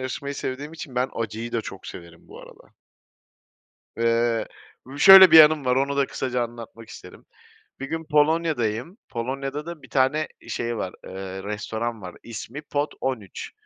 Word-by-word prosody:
yarışmayı 140 +2 -5
sevdiğim 140 +3 -5
için 160 -5 -9
ben 125 +1 0
acıyı 115 +1 -5
da 115 - 0
çok 95 -3 -10
severim 85 -1 -12
bu - - -12
arada. - - -17 1.3
Eee, 115 0 +1 0.4
u 135 +3 -11
şöyle 190 +1 +10
bir 160 - +9
yanım 155 -2 +7
var, 125 0 +2
onu 140 +1 0
da 140 -1 +2
kısaca 125 -2 -2
anlatmak 115 -1 -11
isterim. - - -13 0.6
Bir 135 - -4
gün 160 +1 -3
Polonya'dayım. 150 - +1
Polonya'da 135 +5 -4
da 170 -2 -8
1 - - -15
tane 140 +3 +1
e 115 - -15
şey 120 0 -3
var, 95 -3 -4
eee, 95 0 -7
restoran 110 +2 -4
var, 90 -2 -9
ismi 115 +5 -8
Pot 145 0 -3
13. 115 -8 -4
125 Hz, 165 wpm, -24 LUFS, 115-145 Hz, 1.3 s, şöyle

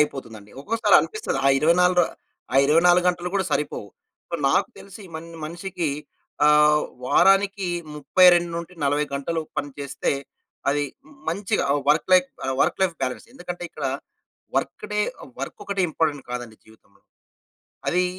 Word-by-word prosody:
అయిపోతుందండి. 115 -8 -3
ఒక్కోసారి 225 +7 +2
అనిపిస్తది, 435 - -3
ఆ - - +7
ఇరవైనాలుర 180 +4 +4 0.5
ఆ - - +4
24 175 +4 +5
గంటలు 180 0 -1
కూడా 195 -1 +1
సరిపోవు. 145 -8 -2 0.5
ఓహ్, 170 - -2
నాకు 135 - +2
తెలిసి 200 +2 -12
మన్ 165 +1 -9 0.2
మనిషికి 170 0 -4 0.6
ఆహ్, 150 0 +5 0.2
వారానికి 195 +5 +4 0.3
32-40 170 -1 +3
గంటలు 160 +4 -2 0.2
పని 145 - -2
చేస్తే, 140 -1 -2 0.6
అది 145 +1 +2 0.2
మ్ 285 - -18
మంచిగా 190 +4 0
ఆహ్, 145 - +1
వర్క్‌లైఫ్ 180 +4 +4 0.2
ఆహ్, 135 - -1
వర్క్‌లైఫ్ 190 -3 +2
బ్యాలన్స్, 130 -1 -3
ఎందుకంటే 180 -8 -7
ఇక్కడ 155 -3 -7 0.7
వర్క్‌డే 210 0 -2 0.2
ఆహ్, - - -12
వర్కొక్కటే 195 +8 -3
ఇంపార్టెంట్ 150 -4 -1
కాదండి 120 -3 -6
జీవితంలో. 110 -2 -23 0.9
అదీ 180 +1 +2
165 Hz, 125 wpm, -24 LUFS, 145-180 Hz, 0.9 s, ఆ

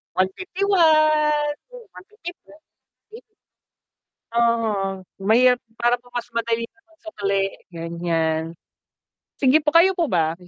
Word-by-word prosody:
151, 370 - 0 0.9
yun - - -13
150 375 -3 -10
po, - - -21 0.6
'di 455 +3 -11 1.1
Uh-huh, 220 -5 0 0.2
mahirap 245 +5 +4 0.2
para 240 +1 +1
po 245 - -30
kasi 240 0 -4
mas 230 - -3
madali 230 0 0
yung 320 +8 -11
pag-sukli, 215 -13 -3 0.3
ganiyan. 165 -1 -1 1.0
Sige 285 +3 +4
po, 300 - +1
kayo 345 +4 +5
po 335 -5 -1
ba? 160 -2 +1
235 Hz, 115 wpm, -22 LUFS, -, 1.1 s, kayo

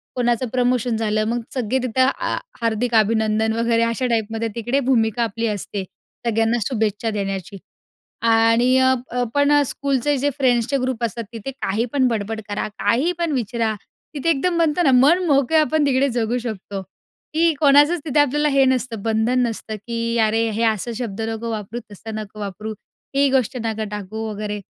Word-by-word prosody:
कोणाचं 240 0 +1
प्रमोशन 245 -2 +1
झालं, 215 -1 0
मग 240 +1 0
सगळे 255 0 0
तिथं 255 +1 0 0.2
आ - - -1 0.3
हार्दिक 230 +1 0
अभिनंदन 220 0 +2
वगैरे 230 0 +2
अशा 230 +2 -1
टाइपमध्ये 225 -1 -1
तिकडे 240 +4 0
भूमिका 240 -3 +1
आपली 230 +1 -2
असते, 205 -1 -3 0.4
सगळ्यांना 225 +1 +2
शुभेच्छा 220 -3 -1
देण्याची. 195 -2 -4 0.6
आणि 230 +3 +4
अ, 260 0 +4 0.2
अ 245 0 0
पण 285 0 +3
अ, 290 0 +5
स्कूलचे 280 +1 0
जे 285 +3 +1
फ्रेंड्सचे 255 0 +2
ग्रुप 255 -2 -2
असतात 230 0 -2
तिथे 230 +4 -5
काही 230 -4 -2
पण 265 -2 +3
बडबड 220 -1 -2
करा, 205 - -2
काही 250 +12 +2
पण 335 -2 0
विचारा, 230 -2 -1 0.4
तिथे 290 +4 -1
एकदम 335 +3 +1
म्हणतो 330 +1 +2
ना 270 - +4
मनमोकळं 290 +2 +4
आपण 305 0 +1
तिकडे 270 +1 +2
जगू 235 0 -1
शकतो, 205 -4 -5 0.5
की 330 +1 +4
कोणाचंच 295 +3 +5
तिथे 295 0 +1
आपल्याला 295 +1 +2
हे 275 -1 +4
नसतं 255 -4 0
बंधन 225 +3 +1
नसतं, 220 -1 -5
की 230 0 -1
"अरे 225 +1 +1
हे 220 +2 -1
असं 220 +1 0
शब्द 225 -3 -4
नको 225 +1 -4
वापरू, 215 +2 -5
तसं 215 +2 -8
नको 215 0 -7
वापरू, 210 +2 -5 0.4
ही 280 0 +4
गोष्ट 260 -1 +1
नको 220 -1 -2
टाकू" 210 +2 -5
वगैरे 210 0 -4
230 Hz, 165 wpm, -21 LUFS, 220-265 Hz, 0.6 s, अ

